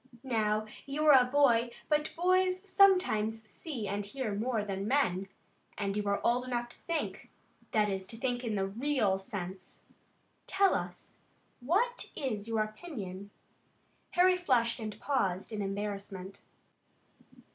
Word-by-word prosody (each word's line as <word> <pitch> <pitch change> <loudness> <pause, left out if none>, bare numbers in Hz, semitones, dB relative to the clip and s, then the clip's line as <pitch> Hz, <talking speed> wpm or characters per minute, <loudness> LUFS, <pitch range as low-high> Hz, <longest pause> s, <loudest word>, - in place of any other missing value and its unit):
Now 215 -4 0 0.2
you 295 +3 -1
are 305 - +8
a - - +2
boy, 245 -4 +4 0.2
but 300 0 0
boys 370 +1 +3
sometimes 295 - +4
see 225 +1 -6
and 200 +1 -2
hear 220 +1 -3
more 220 +1 -1
than 195 0 -3
men, 195 -8 +1 0.5
and 200 -1 -1
you 210 - 0
are 200 0 +1
old 245 +1 +2
enough 240 -1 -2
to - - -13
think; 335 -2 -3 0.4
that 215 -1 +2
is, 190 -2 -3
to 225 - -10
think 245 0 -1
in 225 -3 -1
the 195 -1 +1
real 220 -2 +1
sense. 190 -1 -7 0.6
Tell 390 0 +3
us, - - -5 0.4
what 405 - 0
is 220 -7 -3
your 225 -1 +1
own 215 - -1
opinion?" 205 - -7 0.8
Harry 365 +1 +5
flushed, 250 -9 +2
and 215 -2 -6
paused 195 -8 -1
in 210 - -2
embarrassment. 195 -1 -5
225 Hz, 145 wpm, -31 LUFS, 200-285 Hz, 0.8 s, are